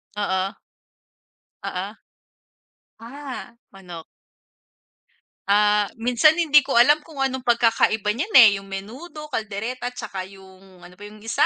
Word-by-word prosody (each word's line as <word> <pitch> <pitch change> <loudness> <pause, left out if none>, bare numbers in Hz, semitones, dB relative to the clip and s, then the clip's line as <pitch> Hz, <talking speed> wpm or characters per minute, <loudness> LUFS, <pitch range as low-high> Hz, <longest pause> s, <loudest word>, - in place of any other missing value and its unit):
oo. 190 -2 -1 1.2
Oo. 190 +3 -5 1.1
Ah, 260 0 -9 0.2
manok. 180 -4 -10 1.5
Ah, 210 0 +3
minsan 250 +7 +3
hindi 300 -3 +5
ko 265 -3 -2
alam 295 +6 +5
kung 310 -1 -15
anong 265 -1 -1
pagkakaiba 225 -3 +2
niyan 365 - -4
eh, 230 -5 +10
yung 195 - -16
menudo, 255 - -8
caldereta 225 +4 -4
tsaka 225 -6 -7
yung 190 -2 -17
ano 180 - -14
pa 195 +3 -15
yung 215 - -15
isa? 225 - +2
225 Hz, 120 wpm, -22 LUFS, 195-265 Hz, 1.5 s, eh